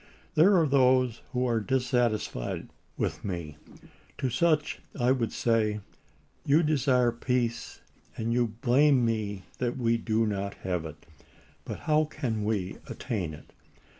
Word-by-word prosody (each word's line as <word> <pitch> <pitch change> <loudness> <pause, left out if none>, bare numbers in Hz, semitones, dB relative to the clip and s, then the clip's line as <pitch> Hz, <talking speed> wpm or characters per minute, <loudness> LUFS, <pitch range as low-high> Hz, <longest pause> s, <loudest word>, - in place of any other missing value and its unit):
There 180 +5 +6
are 165 - +3
those 130 -3 +3
who 125 0 0
are 120 -2 +1
dissatisfied 120 - -1 0.3
with - - -2
me. 85 -6 -5 0.6
To 130 - -1
such 150 +3 +1 0.2
I 125 +1 +3
would 120 -5 0
say: 110 -2 +1 0.6
You 150 +4 +4
desire 130 -5 +3
peace, 120 0 -2 0.4
and 115 +1 -1
you 120 0 +2
blame 125 +3 +3
me 105 -4 -2 0.2
that 125 0 -1
we 115 -2 +2
do 115 0 +1
not 100 -1 -2
have 90 -3 -2
it. 80 -1 -10 0.6
But - - -6
how 155 0 +3
can 115 -8 -3
we 105 -4 -2
attain 90 -9 -4
it 75 - -17
120 Hz, 135 wpm, -28 LUFS, 105-130 Hz, 0.6 s, There